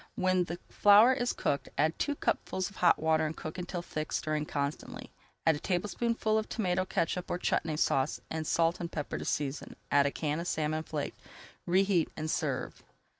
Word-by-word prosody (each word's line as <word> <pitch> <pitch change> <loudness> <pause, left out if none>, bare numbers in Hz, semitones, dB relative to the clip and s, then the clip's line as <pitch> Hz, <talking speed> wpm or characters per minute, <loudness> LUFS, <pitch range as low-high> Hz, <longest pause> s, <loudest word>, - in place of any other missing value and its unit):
When 185 -1 +2
the 170 +1 -5
flour 210 +5 +6
is 245 -2 0
cooked, 140 - -1
add 155 +3 +1
two 290 - 0
cupfuls 185 -7 -1
of 195 - -16
hot 180 - +5
water 160 0 +2
and 155 - -6
cook 155 +4 -6
until 180 0 -4
thick, 155 -2 -5
stirring 155 -1 -1
constantly. 140 +1 -4 0.3
Add 160 - +5
a - - -5
tablespoonful 215 +5 0
of 220 - -5
tomato 185 -4 0
catsup 175 0 -1
or - - 0
Chutney 160 -3 0
Sauce 135 -1 +1
and 160 -1 -3
salt 165 +1 +2
and 170 -1 -4
pepper 150 -2 -4
to - - -6
season. 145 0 -2 0.2
Add 140 0 +5
a - - -1
can 150 +1 -2
of 170 - -4
salmon 155 -1 0
flaked. 150 -2 -5 0.5
Reheat 185 -1 +3
and 155 0 -2
serve. - - -2
165 Hz, 185 wpm, -31 LUFS, 155-185 Hz, 0.5 s, flour